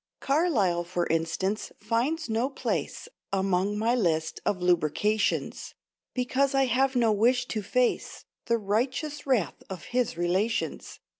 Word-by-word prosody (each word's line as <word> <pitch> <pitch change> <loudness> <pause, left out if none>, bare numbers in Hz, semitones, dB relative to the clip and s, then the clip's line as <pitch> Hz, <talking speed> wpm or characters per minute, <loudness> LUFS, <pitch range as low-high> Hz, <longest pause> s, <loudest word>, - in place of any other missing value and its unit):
Carlyle, 255 - +2
for 175 0 -2
instance, 165 +6 -1
finds 245 +10 -1
no 230 +3 0
place 275 - -3 0.2
Among 195 +1 +1
my 225 +3 +2
list 160 -9 0
of 190 - +1
lucubrations; 180 +4 0 0.4
Because 265 +2 +1
I 270 0 +4
have 265 +2 +1
no 235 -3 +3
wish 245 +4 +3
to 215 - -2
face 245 +5 -1 0.2
The 235 -1 +2
righteous 255 +8 -2
wrath 245 -9 +1
of 185 -3 -7
his 250 -8 0
relations. 185 +6 -1
220 Hz, 130 wpm, -27 LUFS, 185-255 Hz, 0.4 s, I